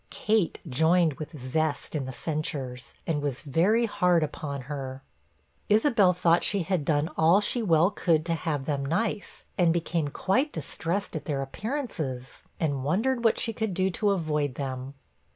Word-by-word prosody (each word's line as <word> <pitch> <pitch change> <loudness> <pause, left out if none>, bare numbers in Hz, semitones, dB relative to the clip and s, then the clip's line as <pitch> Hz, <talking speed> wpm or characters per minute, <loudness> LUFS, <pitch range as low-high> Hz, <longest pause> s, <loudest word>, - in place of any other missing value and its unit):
Kate 215 -5 +1
joined 160 +4 +3
with 155 0 -7
zest 145 +3 -1
in 145 -4 -2
the 130 - -5
censures, 130 -4 -3
and 155 -3 -1
was 140 -3 -2
very 190 - +3
hard 180 -6 +2
upon 145 -2 -4
her. 135 0 -6 0.7
Isabella 210 -4 +4
thought 170 -1 +3
that - - -9
she 200 -3 +1
had 175 -2 0
done 150 +1 +1
all 165 +5 +5
she 235 +3 0
well 175 -2 +4
could 160 -6 +1
to 170 - 0
have 155 -4 -2
them 140 -2 -1
nice; 200 +8 -2 0.2
and 175 -2 +5
became 165 -2 0
quite 250 - 0
distressed 165 +5 -3
at 155 - -4
their 140 -3 -1
appearances, 155 - -5 0.2
and 140 -5 -1
wondered 230 - +1
what 225 - +4
she 225 - 0
should 220 -5 -2
do 190 +1 +1
to 205 +3 +1
avoid 150 -7 0
them. 130 0 -5
160 Hz, 170 wpm, -27 LUFS, 145-190 Hz, 0.7 s, all